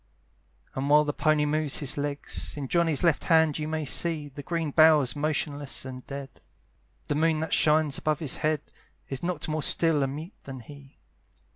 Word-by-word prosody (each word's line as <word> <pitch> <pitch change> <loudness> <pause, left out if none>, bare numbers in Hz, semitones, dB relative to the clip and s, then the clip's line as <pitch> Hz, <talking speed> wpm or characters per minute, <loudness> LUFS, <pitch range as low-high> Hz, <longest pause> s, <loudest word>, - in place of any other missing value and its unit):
And 135 +2 -3
while 150 +1 +6
the 145 -1 -2
pony 155 -1 +1
moves 150 -1 0
his 145 0 -1
legs, 145 +1 -3
In 140 -2 -4
Johnny's 165 -1 +1
left 165 -4 +2
hand 160 -3 +3
you 150 - -3
may 155 -1 -3
see, 155 +1 0
The 145 +1 -9
green 165 0 -3
bough's 155 -4 +5
motionless 145 -2 -2
and 130 -1 -8
dead; 140 -1 -8 0.7
The - - 0
moon 160 +1 +1
that 160 - -3
shines 150 -2 +3
above 155 -1 0
his 155 -6 -3
head 155 -1 0 0.5
Is 135 -1 -4
not 170 -3 -3
more 155 0 -2
still 160 0 +4
and 135 0 -2
mute 160 +6 -8
than 130 -2 -8
he. 140 +3 -15
150 Hz, 180 wpm, -27 LUFS, 140-155 Hz, 0.7 s, while